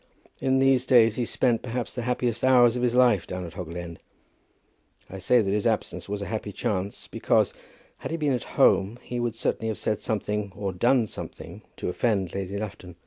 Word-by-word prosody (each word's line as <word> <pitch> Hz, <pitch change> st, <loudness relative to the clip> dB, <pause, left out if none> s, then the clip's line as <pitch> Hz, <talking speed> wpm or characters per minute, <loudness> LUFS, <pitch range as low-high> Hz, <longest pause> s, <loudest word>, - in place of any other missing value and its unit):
In 130 Hz, 0 st, +2 dB
these 135 Hz, -1 st, +3 dB
days 115 Hz, -3 st, +6 dB
he 120 Hz, -, -1 dB
spent, 120 Hz, -1 st, +1 dB
perhaps, 125 Hz, -1 st, -4 dB
the 125 Hz, -, -4 dB
happiest 120 Hz, -1 st, -1 dB
hours 125 Hz, -2 st, +5 dB
of 125 Hz, -, -2 dB
his 125 Hz, -1 st, +1 dB
life 120 Hz, -7 st, +4 dB
down 90 Hz, 0 st, -5 dB
at 85 Hz, -, -9 dB
Hoggle 85 Hz, -1 st, -7 dB
End. 85 Hz, -1 st, -7 dB, 1.1 s
I 95 Hz, -, -7 dB
say 120 Hz, +5 st, +3 dB
that 95 Hz, -, -1 dB
his 105 Hz, +2 st, +1 dB
absence 110 Hz, -2 st, -2 dB
was 100 Hz, 0 st, -3 dB
a -, -, -5 dB
happy 105 Hz, -1 st, -4 dB
chance, 100 Hz, 0 st, -3 dB
because, -, -, +1 dB, 0.5 s
had -, -, -5 dB
he 165 Hz, -, -2 dB
been 150 Hz, -4 st, +1 dB
at 125 Hz, -, -5 dB
home, 100 Hz, +5 st, +2 dB
he 125 Hz, -, -4 dB
would 120 Hz, -2 st, -1 dB
certainly 115 Hz, 0 st, -2 dB
have 110 Hz, -, -2 dB
said 105 Hz, -, -2 dB
something, 105 Hz, -2 st, -2 dB
or 100 Hz, -1 st, -3 dB
done 120 Hz, +6 st, +3 dB
something, -, -, -9 dB
to -, -, -5 dB
offend 95 Hz, -2 st, 0 dB
Lady 100 Hz, 0 st, -4 dB
Lufton. 100 Hz, -4 st, -7 dB
110 Hz, 200 wpm, -26 LUFS, 100-125 Hz, 1.1 s, days